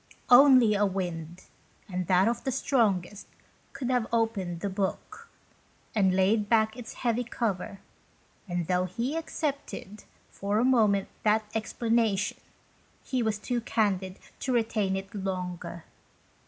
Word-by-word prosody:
Only 250 -3 +8
a 205 0 +2
wind, 175 -3 -3 0.4
and 180 -2 -3
that 185 +2 +4
of 235 - -1
the 265 - -1
strongest, 210 -7 0 0.4
could 255 -1 -3
have 245 -3 +1
opened 200 -7 -1
the - - -1
book, 210 - -4 0.6
and 190 -4 +3
laid 205 +2 +2
back 220 -1 +3
its 245 -2 -9
heavy 235 +1 +2
cover; 205 -5 -3 0.7
and 175 -2 -2
though 180 +1 +1
he 235 - -3
accepted, 285 - -4 0.3
for 200 +1 -2
a 225 - +3
brief 260 - +4
moment, 205 -5 +3
that 215 0 +3
explanation, 225 -2 0 0.7
he 255 -2 -1
was 220 -2 0
too 240 +3 -2
candid 195 -5 0 0.2
to 260 - -2
retain 220 -5 +1
it 195 +1 -6
longer. 180 -4 -4
210 Hz, 135 wpm, -28 LUFS, 190-235 Hz, 0.7 s, Only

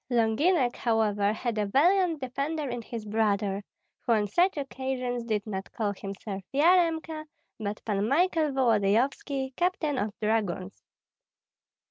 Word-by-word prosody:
Longinek, 245 +4 +2
however, 210 -3 +1
had 225 0 -2
a 205 - 0
valiant 335 - +3
defender 280 +4 -2
in 245 -1 -4
his 225 -1 -7
brother, 205 -2 0 0.4
who 235 - +1
on 210 -2 +2
such 350 - +2
occasions 260 -3 -3
did 215 -3 -1
not 195 -3 -5
call 210 -3 -1
himself 195 0 -6
Yaremka, 320 0 +2 0.3
but 210 -1 -5
Pan 205 -1 0
Michael 325 +1 +2
Volodyovski, 260 +3 +1
captain 335 -6 0
of 210 +1 -1
dragoons. 205 -4 -1
240 Hz, 125 wpm, -28 LUFS, 210-290 Hz, 0.4 s, valiant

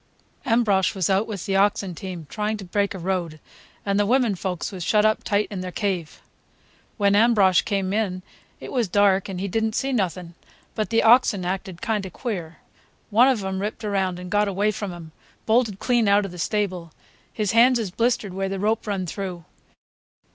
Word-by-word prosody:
Ambrosch 220 -4 +2
was 190 -1 0
out 195 +3 +2
with 205 -5 -5
the 195 - -1
ox 200 +1 +3
team, 175 -1 -7
trying 215 +5 -2
to 200 - -9
break 200 +2 -1
a - - -5
road, 175 -3 -3 0.5
and 200 0 +1
the 205 - +3
women 245 -2 +3
folks 180 -1 -4
was 185 -3 -6
shut 210 +4 +3
up 215 0 +2
tight 205 0 +1
in 190 -3 -4
their 185 0 -5
cave. 185 -6 -3 0.7
When 200 -2 +3
Ambrosch 205 -4 +5
come 195 -2 -2
in 190 -4 -1 0.4
it - - -8
was 245 -5 0
dark 195 0 +2
and 185 -2 -5
he 195 - -2
did 220 +4 -1
n't 220 0 -1
see 270 0 -1
nothing, 180 -5 -2 0.4
but 215 - -2
the 230 0 +2
oxen 225 -5 +4
acted 185 -1 -4
kind 215 -3 0
of 185 - -13
queer. 180 -10 -5 0.5
One 235 +5 +6
of 250 -7 +1
'em 190 0 -3
ripped 215 +2 -4
around 190 -3 -1
and 180 0 -8
got 210 0 +2
away 200 +2 +1
from 205 -2 -5
him—bolted 195 +6 -2
clean 240 0 +1
out 200 0 +4
of 195 - -6
the 180 - -10
stable. 185 -4 -2 0.4
His 210 -3 -1
hands 240 +2 +5
is 215 -6 -3
blistered 230 -2 0
where 195 +1 -2
the 195 - -3
rope 215 +3 -1
run 195 -3 -2
through. 180 -2 -6
200 Hz, 200 wpm, -23 LUFS, 185-215 Hz, 0.7 s, One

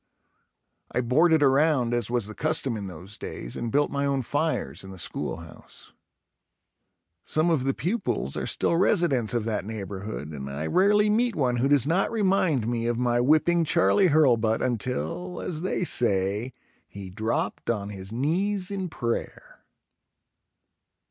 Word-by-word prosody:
I 125 - 0
boarded 155 +6 +3
around 135 -3 +3
as 120 -2 -1
was 120 -3 0
the 110 - -8
custom 150 -3 0
in 100 -2 -5
those 95 +3 -9
days - - -7
and 115 -1 -4
built 145 +3 +2
my 140 0 -1
own 140 -2 0
fires 130 - -2
in 95 - -10
the 95 - -10
schoolhouse. 80 -1 -7 1.3
Some 160 +2 +1
of 140 -6 +1
the 135 - 0
pupils 175 - -2
are - - -3
still - - 0
residents 165 - +2
of 115 -2 -1
that 110 -2 -2
neighborhood 100 -5 -6
and 70 -3 -7
I 70 +3 -4
rarely 205 - +3
meet 225 +1 +1
one 125 -4 +1
who 125 +3 +2
does 145 -4 +4
not 175 +6 +1
remind 185 - +1
me 115 -1 -1
of 120 -1 0
my 120 -1 +1
whipping 155 +5 +3
Charlie 175 +4 +3
Hurlbut 120 -8 +3
until, 130 - -3
as 160 -3 -4
they 185 0 -1
say, 105 - +1 0.4
he 95 -2 -9
dropped 110 +4 -2
on 105 -3 -1
his 95 -1 -8
knees 180 - -1
in 190 -2 -3
prayer. 120 -6 -5
125 Hz, 155 wpm, -26 LUFS, 110-165 Hz, 1.3 s, does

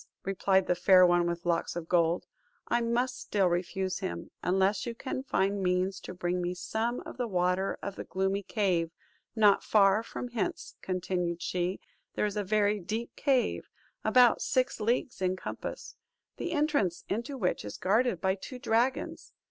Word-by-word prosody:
replied 190 0 +2
the - - +2
Fair 185 +1 +6
One 175 -1 +3
with 170 0 -3
Locks 170 -1 0
of 170 -2 -5
Gold, 170 0 +2 0.4
"I 240 - +1
must 245 +2 0
still 200 -2 +1
refuse 185 +2 -1
him, 85 0 -5
unless 190 +4 +1
you 235 - -4
can 260 +1 -4
find 200 -6 0
means 185 +1 0
to 185 - -9
bring 180 0 -1
me 175 +1 -2
some 230 +6 -2
of - - -10
the 245 -2 -1
water 180 0 0
of 200 -1 -4
the - - -4
gloomy 190 +1 -1
cave. 185 -5 0 0.5
Not 210 -3 +5
far 200 0 +4
from 245 +2 -6
hence," 230 -4 -3
continued 180 -2 -2
she, 180 +1 -1 0.4
"there - - +1
is 205 -1 -2
a 210 - 0
very 210 +1 +2
deep 220 +6 -4
cave, 270 -4 +1 0.3
about 250 -2 +5
six 255 -1 0
leagues 235 0 -1
in 185 0 +1
compass; - - -6 0.4
the 345 - -3
entrance 295 - +1
into 235 +7 -3
which 185 -7 -1
is 105 - -7
guarded 215 0 +2
by 190 +2 +1
two 225 +7 -8
dragons. 250 +1 -1
195 Hz, 170 wpm, -30 LUFS, 180-230 Hz, 0.5 s, Fair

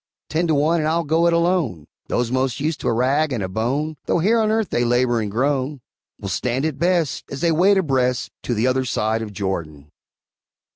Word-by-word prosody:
Ten 165 +2 0
to 160 - +2
one, 155 +4 +2
and 155 - 0
I'll 170 +1 +1
go 165 +3 +2
it - - +3
alone; 170 - 0 0.2
Those 120 -1 -1
most 130 -2 0
used 150 +2 -1
to - - -4
a - - +3
rag 135 +6 +1
and 115 -6 -2
a - - -2
bone, 135 +10 -2
Though - - +2
here 215 +7 +3
on 215 -1 +2
earth 220 -2 0
they 120 - +1
labor 120 -1 +2
and 105 - -3
groan, 135 +5 -1 0.4
Will - - -6
stand 125 - -1
it 150 -3 -3
best, 170 -3 +1
as 140 - -6
they 170 - +3
wade 190 +5 +4
abreast 130 -7 0
To 120 - -1
the 110 +3 +1
other 130 +1 +2
side 110 -2 -1
of 110 -2 -5
Jordan. 80 -7 -5
135 Hz, 215 wpm, -21 LUFS, 115-160 Hz, 0.4 s, wade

